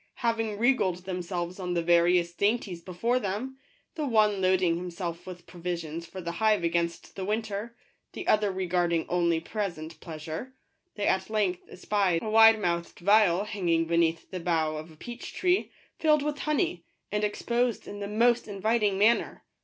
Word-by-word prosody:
Having 225 -2 0
regaled 195 -7 +1
themselves 180 -1 -4
on 180 -1 -3
the 170 - +1
various 175 0 +3
dainties 200 -3 0
before 230 +9 0
them, 245 +6 -4 0.2
— - - -42
the 310 - -3
one 210 -4 +3
loading 185 -2 +3
himself 175 0 -5
with 180 -1 -9
provisions 170 -2 -5
for 190 - -8
the 170 -2 -4
hive 215 +1 +2
against 170 0 -1
the 190 - -4
winter, 215 +2 -3 0.4
the 365 - -7
other 210 -2 +3
regarding 175 -3 0
only 170 -2 +1
present 165 -5 -5
pleasure, 160 +10 -7 0.2
— 360 - -49
they 205 - -2
at 190 +1 +1
length 205 -5 0
espied 185 -2 0
a 220 - -3
wide 225 0 +7
mouthed 170 -3 -2
vial 200 -1 +4
hang 200 -4 -3
ing 165 0 +3
beneath 165 0 0
the 185 - -4
bough 160 -3 0
of 155 +2 -8
a 160 - -15
peach 240 +9 -8
tree, 365 0 +1 0.3
filled 305 -2 +3
with 295 -1 -2
honey, 285 - 0 0.3
and 210 +1 -1
exposed 235 +3 -1
in 205 - -7
the 200 - -4
most 235 +3 +2
inviting 205 0 +1
manner. 220 +4 +2
190 Hz, 170 wpm, -28 LUFS, 170-220 Hz, 0.4 s, wide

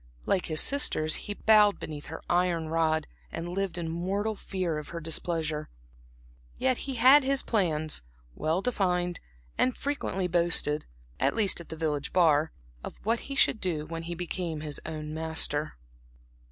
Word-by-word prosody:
Like 185 - 0
his 155 -1 +4
sisters, 155 - +4
he 205 - -1
bowed 210 -2 +5
beneath 150 -2 -7
her 160 - -8
iron 175 -2 +1
rod 160 -1 +1 0.3
and 170 - -5
lived 185 0 -3
in 170 -1 -3
mortal 190 +6 -1
fear 185 -6 -3
of 150 - -9
her 170 - -6
displeasure. 160 -1 -2 0.9
Yet 260 -1 +2
he 265 - -3
had 260 +5 +7
his 275 0 +1
plans, 155 - 0 0.3
well 160 - -1
defined, 180 -7 0 0.4
and 255 -1 +2
frequently 275 -10 -2
boasted 170 -3 +2 0.3
(at - - +1
least 205 -6 +2
at 170 - -14
the 160 - -6
village 150 -3 -2
bar) 160 -3 +4 0.3
of - - -8
what 230 +2 +1
he 275 - -3
should 220 - +3
do 160 -5 -2
when 165 +1 -6
he 170 +1 -5
became 170 -2 -4
his 150 -2 -4
own 155 -1 -5
master. 160 -1 0
170 Hz, 160 wpm, -28 LUFS, 155-195 Hz, 0.9 s, had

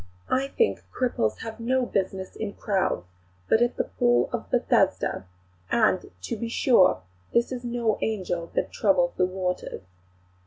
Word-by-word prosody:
I 265 +1 +2
think 450 - 0
cripples 235 - -1
have 225 0 -7
no 255 +2 +1
business 190 -3 -2
in 210 -2 -4
crowds, 190 - 0 0.4
but 220 - +4
at 240 +1 +2
the - - +2
Pool 120 +6 +2
of - - -4
Bethesda; 95 - +1 0.4
and, - - +2
to 90 - -3
be 230 - -4
sure, 210 - +4 0.3
this 235 +2 +3
is 250 -1 -4
no 235 -3 0
angel 175 -6 -2
that - - 0
troubles - - +2
the 180 - +2
waters." 185 - -3
220 Hz, 150 wpm, -26 LUFS, 180-245 Hz, 0.4 s, but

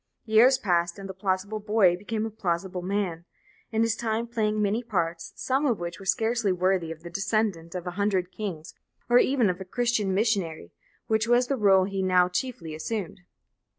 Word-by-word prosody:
Years 235 +4 +5
passed 175 -4 0
by, 200 - -10
and 195 - -7
"the - - -5
plausible 190 +2 -2
boy" 210 -4 +3
became 215 +4 -3
a 225 - -4
plausible 185 -3 -2
man, 180 -3 -2 0.5
in 225 0 +2
his 230 0 +1
time 225 0 -1
playing 215 -2 -1
many 210 +3 +1
parts, 170 -7 -2
some 270 +3 0
of 235 -5 +1
which 170 +1 -5
were 195 - -10
scarcely 225 0 +1
worthy 185 -2 +1
of 165 0 -9
the 170 - -8
descendant 195 -4 -1
of 180 -1 -4
a 180 - -3
hundred 190 -1 0
kings, 180 -8 -6 0.4
or 245 - +7
even 260 -4 +3
of 180 0 -2
a - - -3
Christian 235 -1 0
missionary, 195 - -1 0.3
which 220 0 +1
was 240 +1 +4
the - - +2
rôle 195 -5 +4
he 195 -1 -2
now 185 -1 +4
chiefly 180 -4 -4
assumed. 185 +3 -4
200 Hz, 190 wpm, -26 LUFS, 180-220 Hz, 0.5 s, or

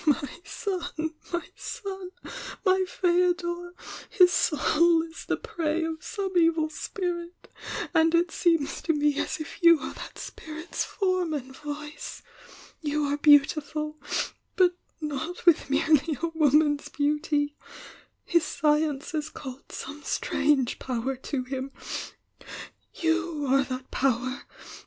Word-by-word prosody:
"My 295 +1 +1
son, 340 -6 -3 0.2
my 345 -1 -2
son! 385 -3 -6 0.6
My 375 0 +4
Feodor! 350 -1 +1 0.3
His 365 -4 +6
soul 330 +1 +3
is 330 0 -9
the - - 0
prey 325 0 -1
of 320 -1 -4
some 390 -4 -4
evil 330 -2 +3
spirit 350 0 -4 0.2
— - - -4
and 325 0 +4
it 340 0 +3
seems 330 -5 +1
to 325 - +1
me 295 -1 +2
as - - -1
if 310 - -7
you 335 -2 +8
are - - -5
that - - -9
spirit's 315 +2 -5
form 370 -5 0
and 265 -2 -6
voice! 295 +1 -7 0.6
You 300 -1 0
are 285 0 0
beautiful 300 +1 +3 0.2
— - - -18
but 360 -1 +4 0.2
not 305 +3 -4
with 340 -5 +5
merely 305 0 +3
a 335 - -1
woman's 300 -2 +3
beauty! 295 0 0 0.3
— - - -17 0.3
his 340 -2 +3
science 300 -2 +1
has 310 -1 -2
called 265 -3 -9
some 295 +1 -7
strange 280 -3 +1
power 255 +1 -2
to 260 +1 -3
him 265 +1 -4 0.6
— - - -13
you 325 -2 0
are 275 +1 +4
that 255 0 -6
power! 255 0 0
310 Hz, 135 wpm, -27 LUFS, 290-345 Hz, 0.6 s, you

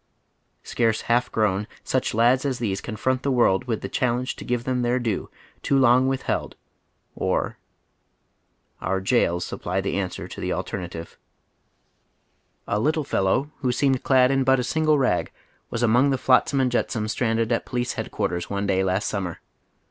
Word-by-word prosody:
Scarce 115 -2 0
half 120 +1 +1
grown, 105 -1 0 0.2
such 130 -4 -1
lads 120 +3 +4
as 135 -3 -1
these 100 -5 -2
confront 130 +3 -1
the 140 - -1
world 120 -7 +3
with 115 -4 -2
the - - -4
challenge 125 +4 -1
to - - -8
give 120 -1 -1
them 125 0 -1
their 120 +1 +1
due, 115 -5 -2 0.3
too 140 - +1
long 130 0 +5
withheld, 135 -1 -2 0.6
or. - - -1 1.2
Our 95 - 0
jails 95 -4 +1
supply 90 +2 -3
the 95 0 -1
answer 95 -2 -4
to - - -9
the - - -1
alternative. 85 -3 -6 1.5
A 105 - 0
little 155 +6 +1
fellow 130 +5 0
who 130 -3 0
seemed 130 +1 +1
clad 130 -1 +4
in 135 -1 +2
but 130 0 +4
a - - 0
single 155 +3 +2
rag 125 -10 +1 0.4
was 115 - -2
among 120 +4 +4
the 135 - +1
flotsam 135 +2 +3
and 130 -2 +2
jetsam 115 -2 -1
stranded 115 +1 0
at 115 - 0
Police 125 0 -2
Head - - -5
quarters 85 0 -2
one 100 0 -2
day 95 -1 +1
last 95 +2 0
summer. 90 -5 -3
120 Hz, 170 wpm, -24 LUFS, 100-130 Hz, 1.5 s, long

